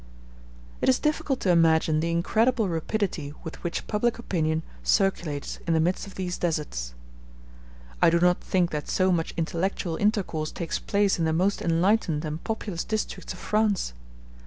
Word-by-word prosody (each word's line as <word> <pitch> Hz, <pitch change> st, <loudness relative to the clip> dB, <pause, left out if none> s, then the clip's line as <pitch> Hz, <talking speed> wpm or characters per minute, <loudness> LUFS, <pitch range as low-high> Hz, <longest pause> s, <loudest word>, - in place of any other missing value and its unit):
It -, -, +3 dB
is 260 Hz, -, +5 dB
difficult 300 Hz, -3 st, 0 dB
to 185 Hz, -, +3 dB
imagine 160 Hz, -2 st, +4 dB
the 165 Hz, +2 st, 0 dB
incredible 220 Hz, +7 st, +2 dB
rapidity 165 Hz, -3 st, -2 dB
with 160 Hz, -, -8 dB
which 170 Hz, -, -3 dB
public 225 Hz, +2 st, 0 dB
opinion 160 Hz, -8 st, -1 dB, 0.2 s
circulates 150 Hz, -, 0 dB
in 165 Hz, -, +3 dB
the -, -, +3 dB
midst 180 Hz, +5 st, 0 dB
of 195 Hz, -, -12 dB
these 180 Hz, -1 st, -3 dB
deserts. 145 Hz, -, -2 dB
*j -, -, -6 dB
I -, -, +8 dB
do 170 Hz, +1 st, +3 dB
not 180 Hz, 0 st, +3 dB
think 180 Hz, -2 st, +1 dB
that 150 Hz, -1 st, -4 dB
so 185 Hz, 0 st, +2 dB
much 165 Hz, -2 st, -1 dB
intellectual 170 Hz, 0 st, -1 dB
intercourse 195 Hz, -7 st, 0 dB
takes 170 Hz, -, -3 dB
place 200 Hz, -2 st, +1 dB
in 165 Hz, -, +2 dB
the 160 Hz, -, +1 dB
most 185 Hz, +5 st, +1 dB
enlightened 170 Hz, -2 st, +2 dB
and 155 Hz, +1 st, -5 dB
populous 205 Hz, -6 st, -3 dB
districts 215 Hz, -4 st, -3 dB
of -, -, -11 dB
France. 210 Hz, -, 0 dB
170 Hz, 165 wpm, -26 LUFS, 155-195 Hz, 0.2 s, I